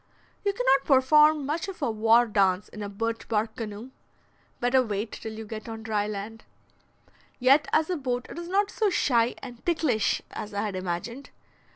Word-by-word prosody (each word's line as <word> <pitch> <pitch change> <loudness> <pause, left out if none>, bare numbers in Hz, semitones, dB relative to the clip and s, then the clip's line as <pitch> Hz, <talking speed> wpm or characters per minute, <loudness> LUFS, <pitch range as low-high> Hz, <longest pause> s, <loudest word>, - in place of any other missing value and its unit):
You 405 - +2
cannot 265 -5 +2
perform 300 +2 +5
much 310 +7 -2
of 385 -2 -7
a 280 -7 0
war 225 +2 +4
dance 195 -3 +1
in 215 - -9
a 205 - -4
birch 225 +3 -3
bark 220 0 -1
canoe: 225 +2 -6 0.7
better 245 +2 +3
wait 215 -2 -3
till 220 - -7
you 220 0 -7
get 215 +1 -7
on 225 0 -7
dry 210 -2 -1
land. 210 +2 -6 0.9
Yet 275 +3 +4
as 315 0 +3
a 360 - 0
boat 250 -3 -2
it - - -8
is 340 - -7
not 400 +2 +1
so 430 -2 +1
shy 240 -9 +2
and 245 -3 -10
"ticklish" 305 -11 +1
as 210 -1 -7
I 200 - 0
had 205 -3 -3
imagined. 185 +9 -4
235 Hz, 185 wpm, -27 LUFS, 215-275 Hz, 0.9 s, perform